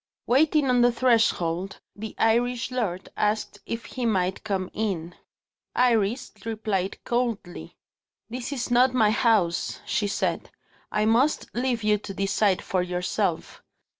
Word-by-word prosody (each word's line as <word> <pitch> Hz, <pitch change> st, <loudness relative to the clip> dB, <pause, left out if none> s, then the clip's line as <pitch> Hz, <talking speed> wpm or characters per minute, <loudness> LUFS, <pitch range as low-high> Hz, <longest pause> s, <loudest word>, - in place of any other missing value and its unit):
Waiting 295 Hz, +2 st, +3 dB
on 250 Hz, -1 st, +3 dB
the 245 Hz, 0 st, +5 dB
threshold, 200 Hz, -7 st, +1 dB, 0.2 s
the 215 Hz, +1 st, -7 dB
Irish 240 Hz, +2 st, +1 dB
lord 200 Hz, -8 st, -2 dB
asked 210 Hz, +1 st, -1 dB
if 230 Hz, 0 st, -4 dB
he 255 Hz, -, -5 dB
might 190 Hz, -5 st, 0 dB
come 195 Hz, -4 st, -2 dB
in. 180 Hz, -6 st, -2 dB, 0.6 s
Iris 235 Hz, -1 st, +2 dB
replied 215 Hz, -4 st, -2 dB
coldly. 235 Hz, -7 st, -3 dB, 0.5 s
"This 245 Hz, +3 st, -5 dB
is 250 Hz, -3 st, -3 dB
not 250 Hz, +1 st, +4 dB
my 215 Hz, -4 st, +4 dB
house," 215 Hz, -7 st, +1 dB
she 205 Hz, -, 0 dB
said; 200 Hz, -, -2 dB, 0.4 s
"I 210 Hz, 0 st, +1 dB
must 245 Hz, +7 st, +2 dB
leave 245 Hz, -2 st, -1 dB
you 210 Hz, -1 st, +3 dB
to 195 Hz, -1 st, -8 dB
decide 195 Hz, 0 st, +1 dB
for 185 Hz, -, 0 dB
yourself." 180 Hz, 0 st, -2 dB
220 Hz, 135 wpm, -25 LUFS, 195-245 Hz, 0.6 s, the